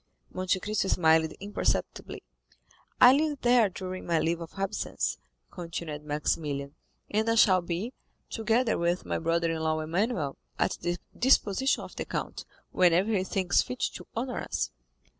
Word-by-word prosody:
Monte 185 +1 0
Cristo 210 0 -1
smiled 160 -3 +3
imperceptibly. 205 +1 -2 0.8
"I 245 - +9
live 295 0 0
there 240 -3 +4
during 185 0 -6
my 170 -1 +2
leave 170 +1 0
of 165 +3 -9
absence," 195 0 -2 0.3
continued 165 -3 -6
Maximilian; 145 -1 -2 0.4
"and 220 +2 +1
I 230 - +3
shall 190 -5 +5
be, 175 +8 -4 0.3
together 225 +1 +1
with 170 +1 0
my - - -2
brother 165 0 +1
in 165 - -2
law 160 0 0
Emmanuel, 160 - -1 0.2
at - - 0
the 175 0 -1 0.2
disposition 265 0 +3
of - - -10
the - - -3
Count, - - -4 0.3
whenever 180 +4 +3
he 185 - +1
thinks 185 -1 +2
fit 250 - -6
to - - -9
honor 250 +2 -2
us." - - -2
185 Hz, 150 wpm, -28 LUFS, 165-220 Hz, 0.8 s, I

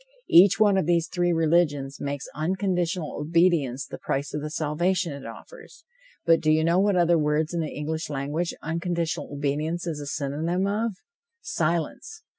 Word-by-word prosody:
Each 185 +5 +7
one 205 -2 +5
of 185 - 0
these 170 -1 +2
three 175 0 0
religions 155 -4 +1
makes 140 0 -3
unconditional 180 0 -1
obedience 155 -5 +2
the - - -9
price 140 +2 -3
of 150 - -2
the 150 - -4
salvation 165 +2 0
it 140 -4 -8
offers, 445 - -13 0.4
but 165 -1 +5
do 155 - +1
you 155 0 +3
know 170 +3 +3
what 200 0 +3
other 170 -1 +4
word 150 +1 +1
in 170 - -1
the 155 -2 -2
English 160 +2 -4
language 145 +4 -2
unconditional 170 0 -2
obedience 150 +4 -2
is 160 -3 -3
a 145 - -7
synonym 155 +7 -1
of? 215 +3 -1 0.5
Silence! 175 - -2
165 Hz, 165 wpm, -25 LUFS, 150-175 Hz, 0.5 s, Each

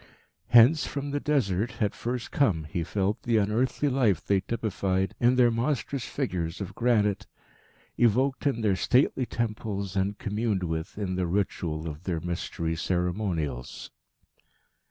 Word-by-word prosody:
Hence, 120 +6 +6
from 140 0 -4
the 145 - -1
Desert, 120 -8 0
had 105 -3 -1
first 120 0 -4
come, 100 - +2
he 80 +3 -3
felt, 95 +4 -1
the 115 -2 +1
unearthly 115 +7 +1
life 125 -8 +2
they 100 -1 +3
typified 95 -3 -1
in 120 +1 +4
their 125 -2 +5
monstrous 130 +2 -1
figures 90 - -3
of 95 -2 -5
granite, 105 -3 +1 0.7
evoked 130 +5 +2
in 120 -5 0
their 105 -3 +2
stately 130 +4 +2
temples, 105 -4 -3
and 100 +2 0
communed 105 -2 -1
with 80 +1 -4
in 95 -3 -2
the 90 -1 0
ritual 85 -4 -2
of 75 +2 -7
their 85 -3 -1
Mystery 85 -1 -3
ceremonials. 90 - -2
105 Hz, 140 wpm, -27 LUFS, 90-120 Hz, 0.7 s, Hence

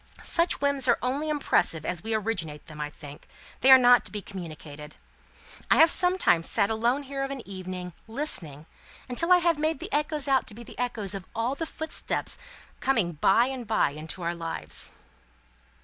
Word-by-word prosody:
Such 335 -3 +1
whims 280 -2 +2
are - - +4
only 280 +5 -1
impressive 270 - 0
as 175 -2 -2
we 225 +1 -2
originate 185 -9 -3
them, 150 -1 -9
I 150 - -3
think; 145 -1 -12 0.3
they 260 - +4
are 265 - +11
not 245 -1 +6
to - - -8
be 210 - -4
communicated. 155 -6 -9 0.7
I - - +6
have 325 0 +7
sometimes 360 - +3
sat 200 - +2
alone 240 +6 0
here 275 0 -4
of 275 - -3
an 275 -3 -7
evening, 185 -2 -7
listening, 185 - -3 0.4
until 295 +8 0
I 360 - +9
have 340 -3 +1
made 315 0 0
the - - -7
echoes 295 0 0
out 270 -2 +2
to 210 - -7
be 235 - -10
the - - -12
echoes 225 -5 -2
of 195 -2 -6
all 230 +3 0
the 325 +3 -4
footsteps 315 0 -1
that - - -22
are - - -19
coming 225 -10 +1
by 195 +9 +3
and 255 -3 -5
bye 215 -9 +2
into 155 +4 -7
our 170 +1 -1
lives." 165 -1 -2
225 Hz, 195 wpm, -27 LUFS, 175-275 Hz, 0.7 s, are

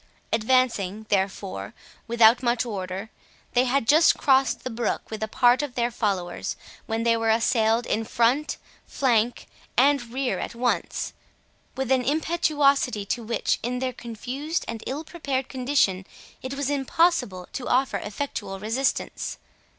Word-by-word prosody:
Advancing, 220 -3 +1
therefore, 190 - -2 0.3
without 230 0 +5
much 240 -1 +1
order, 195 -1 -5 0.4
they 250 +1 +4
had 255 -1 +1
just 315 +5 +6
crossed 270 -1 +3
the 255 - -4
brook 230 0 -2
with 220 - -5
a 220 - -1
part 245 +4 +4
of 290 -4 -5
their 240 0 0
followers, 195 -7 -2 0.3
when 225 0 -1
they 230 0 +3
were 225 0 0
assailed 225 +1 +2
in 225 - 0
front, 240 +7 +1 0.3
flank, 240 -3 +1 0.3
and 265 -2 +3
rear 260 0 -1
at - - -5
once, 245 +1 -1 0.6
with 265 -1 -2
an 260 -1 +4
impetuosity 290 -6 +2
to 235 +4 -2
which, 230 +1 0
in 245 +2 -2
their 255 0 -2
confused 255 +8 -4
and 225 -1 -5
ill 290 +4 -3
prepared 280 -6 -3
condition, 250 -8 +1 0.3
it 260 +1 -5
was 285 0 -1
impossible 270 - +1
to 255 - -4
offer 260 +2 +2
effectual 205 -3 -5
resistance. 230 +7 -1
245 Hz, 145 wpm, -25 LUFS, 220-270 Hz, 0.6 s, just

